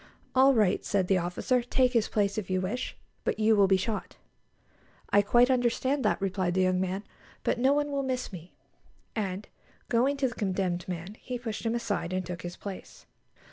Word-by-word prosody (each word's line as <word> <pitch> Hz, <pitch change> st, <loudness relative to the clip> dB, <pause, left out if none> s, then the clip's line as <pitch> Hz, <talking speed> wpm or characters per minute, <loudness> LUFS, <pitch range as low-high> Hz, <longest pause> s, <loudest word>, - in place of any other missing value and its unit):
_" -, -, -22 dB, 0.3 s
"All 265 Hz, +1 st, +6 dB
right," 210 Hz, -4 st, +3 dB
said 195 Hz, -3 st, +1 dB
the 190 Hz, -1 st, +3 dB
officer; 180 Hz, +8 st, 0 dB
"take 250 Hz, +1 st, +2 dB
his 230 Hz, -3 st, +3 dB
place, 200 Hz, 0 st, 0 dB
if 190 Hz, -, -7 dB
you 185 Hz, 0 st, +1 dB
wish; 205 Hz, +8 st, -3 dB, 0.3 s
but -, -, -1 dB
you 220 Hz, 0 st, +4 dB
will 200 Hz, -2 st, +5 dB
be 190 Hz, 0 st, +4 dB
shot." 210 Hz, +3 st, -3 dB, 1.0 s
"I 205 Hz, -, +6 dB
quite 240 Hz, +5 st, +4 dB
understand 260 Hz, +2 st, +1 dB
that," -, -, +2 dB
replied 185 Hz, -2 st, -1 dB
the 190 Hz, -, +3 dB
young 185 Hz, 0 st, +2 dB
man; 190 Hz, +2 st, -2 dB, 0.4 s
"but -, -, 0 dB
no 260 Hz, +3 st, +4 dB
one 290 Hz, 0 st, 0 dB
will 280 Hz, -1 st, 0 dB
miss 255 Hz, -5 st, -3 dB
me"; 175 Hz, 0 st, -10 dB, 0.6 s
and, 200 Hz, -2 st, -3 dB, 0.4 s
going 255 Hz, +4 st, +2 dB
to 270 Hz, -1 st, +2 dB
the 245 Hz, -, -5 dB
condemned 185 Hz, -4 st, -1 dB
man, 180 Hz, +4 st, -6 dB
he 250 Hz, -1 st, -5 dB
pushed 230 Hz, -1 st, -4 dB
him 225 Hz, -, 0 dB
aside, 205 Hz, -6 st, -2 dB
and 185 Hz, 0 st, -1 dB
took 175 Hz, -1 st, -6 dB
his 175 Hz, 0 st, -7 dB
place. 195 Hz, -2 st, -9 dB
205 Hz, 200 wpm, -29 LUFS, 185-245 Hz, 1.0 s, All